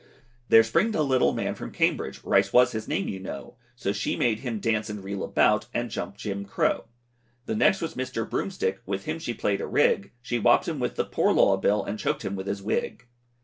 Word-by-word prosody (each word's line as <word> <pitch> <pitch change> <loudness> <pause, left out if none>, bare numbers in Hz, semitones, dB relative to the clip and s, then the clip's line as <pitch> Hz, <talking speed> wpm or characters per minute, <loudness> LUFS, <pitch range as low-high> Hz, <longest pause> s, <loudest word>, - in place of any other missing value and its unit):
There 115 - +8
Springed 200 - +1
a 155 - +2
little 130 -3 +3
man - - -2
from - - -7
Cambridge, - - -1
Rice 100 0 +3
was 125 0 +5
his 110 -1 -5
name 100 - -1
you 95 - -4
know, 95 -7 -8 0.2
So 100 - -2
she 105 - -1
made 110 -3 +1
him 120 -5 -4
dance 110 -1 0
and 105 -2 -6
reel 100 0 -4
about, 105 0 +2
And 120 -1 -2
jump 100 - -5
Jim 100 -2 -4
Crow. 100 - 0 0.6
The - - -2
next 195 -2 +3
was 165 - -3
Mr. 130 -3 -3
Broomstick, 100 - -2
With 100 0 -3
him 160 +1 -3
she 120 -8 -4
play'd 100 -1 -1
a - - -3
rig, 100 - +2
She 120 0 -1
wopped - - +4
him - - -2
with - - -2
the - - 0
Poor - - +1
Law 95 - +5
Bill, 100 +2 +1
And 105 +2 -5
choked - - -2
him 100 - -2
with 95 0 -6
his 100 0 -3
wig. 110 - -2
105 Hz, 225 wpm, -26 LUFS, 100-125 Hz, 0.6 s, There